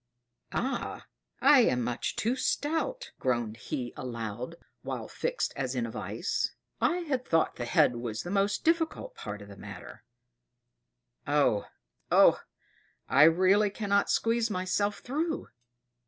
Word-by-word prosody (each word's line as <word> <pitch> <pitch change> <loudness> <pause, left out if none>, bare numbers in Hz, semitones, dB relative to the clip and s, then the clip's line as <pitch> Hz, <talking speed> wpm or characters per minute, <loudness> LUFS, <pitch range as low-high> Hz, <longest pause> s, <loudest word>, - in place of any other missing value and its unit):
"Ah! 260 +3 -3 0.4
I 290 - +8
am 125 - +3
much 120 +1 -2
too 235 +4 0
stout," 330 - -1
groaned 120 -4 0
he 120 0 -4
aloud, 120 +3 -5 0.3
while - - -5
fixed - - -2
as 130 -2 -2
in 120 -2 0
a 115 - -5
vice. 105 - -2 0.3
"I 355 +1 +2
had 275 -7 -1
thought 165 -8 +1
the 120 - -3
head 120 0 +3
was 115 -2 -4
the 175 - -5
most 200 +1 +1
difficult 330 +9 0
part 105 - -7
of - - -13
the 100 - -11
matter 100 -3 -10 1.2
oh! 145 -8 +2 0.4
oh! - - +6 0.7
I - - +7
really 190 +5 +5
cannot 200 -1 +1
squeeze 230 0 +2
myself 205 +2 -1
through!" 315 +5 -2
185 Hz, 135 wpm, -29 LUFS, -, 1.2 s, I